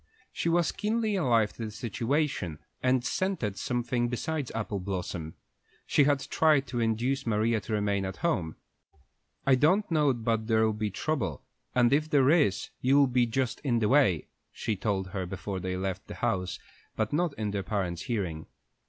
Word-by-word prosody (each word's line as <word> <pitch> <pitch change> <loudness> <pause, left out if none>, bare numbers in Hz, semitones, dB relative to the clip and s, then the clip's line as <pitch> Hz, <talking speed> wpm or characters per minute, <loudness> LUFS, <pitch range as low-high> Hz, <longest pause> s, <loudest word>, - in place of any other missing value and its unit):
She 170 - -1
was 170 0 +2
keenly 215 0 0
alive 115 - +2
to 115 - -5
the - - -4
situation, 115 - -1 0.2
and 130 -1 +2
scented 170 - -1
something 120 +1 -1
besides 140 +3 -2
apple 105 -3 -2
blossoms. 90 -4 -4 0.5
She 145 - +4
had 145 -1 +2
tried 150 -3 +3
to 120 - -2
induce 115 +4 0
Maria 110 +1 +2
to 110 - -5
remain 100 -2 +1
at 95 0 -5
home. 90 - 0 0.9
"I 135 - +5
don't 170 +10 +3
know 150 -3 +4
but 115 -2 -1
there'll 110 -1 +3
be 105 0 -2
trouble, 100 - -2 0.3
and 125 0 +4
if 155 +2 +2
there 140 -2 +4
is, 150 - +2
you'll 140 +2 +5
be 125 -2 +2
just 125 +1 -1
in 125 -5 0
the 110 -2 +1
way," 130 - +4 0.3
she 110 -3 -2
told 95 -1 -1
her 95 -1 -3
before 95 +1 -4
they 90 0 -3
left 95 0 -3
the - - -7
house, 95 -6 -1 0.4
but 110 +2 -1
not 165 -1 +1
in 105 -5 -2
their 100 -1 -1
parents' 95 -5 -2
hearing. 95 -10 -3
115 Hz, 170 wpm, -29 LUFS, 100-140 Hz, 0.9 s, I